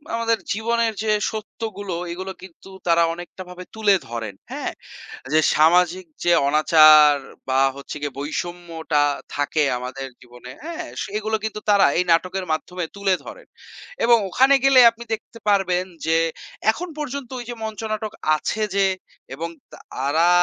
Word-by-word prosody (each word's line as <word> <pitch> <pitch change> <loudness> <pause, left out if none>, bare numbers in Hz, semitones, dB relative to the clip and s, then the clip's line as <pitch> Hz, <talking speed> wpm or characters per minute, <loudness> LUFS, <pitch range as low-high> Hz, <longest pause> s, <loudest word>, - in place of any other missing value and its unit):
আমাদের 230 0 +1 0.2
জীবনের 230 +1 0
যে 215 - +1 0.2
সত্যগুলো 205 -3 -6 0.2
এগুলো 185 +2 -5
কিন্তু 190 +1 -14 0.2
তারা 170 0 +4
অনেকটা 175 +2 -10
ভাবে 180 0 -9
তুলে 210 -3 +4
ধরেন, 115 -4 -5 0.2
হ্যাঁ? - - -3 0.6
এইযে 155 +2 +4 0.2
সামাজিক 175 +3 +4 0.2
যে 175 - +4 0.2
অনাচার 155 0 +7 0.3
বা 130 0 +2 0.2
হচ্ছে 140 +2 -8
গিয়ে 145 -2 -5
বৈষম্যটা 165 0 -2 0.3
থাকে 145 +2 0 0.2
আমাদের 130 +2 -6
জীবনে, 125 0 -13
হ্যাঁ? 335 0 -5 0.2
সেগুলো 215 +2 -2
কিন্তু 215 -1 -4
তারা 200 -1 +6
এই 180 - +2
নাটকের 185 +3 0
মাধ্যমে 180 +3 -3
তুলে 200 -1 +1
ধরেন - - -11 0.6
এবং 235 0 +6
ওখানে 265 +8 +4
গেলে 270 -2 +7
আপনি 230 +1 -11
দেখতে 225 +1 -10
পারবেন 185 -3 +2 0.2
যে 160 0 +3 0.5
এখন 345 +11 -5
পর্যন্ত 280 -3 -5
ওইযে 240 0 -6
মঞ্চ 220 -1 -5
নাটক 215 0 -3 0.2
আছে 215 +7 -3
যে 200 0 +3 0.5
এবং 165 +5 -4 0.3
তারা 145 +6 0
185 Hz, 140 wpm, -22 LUFS, 155-220 Hz, 0.6 s, অনাচার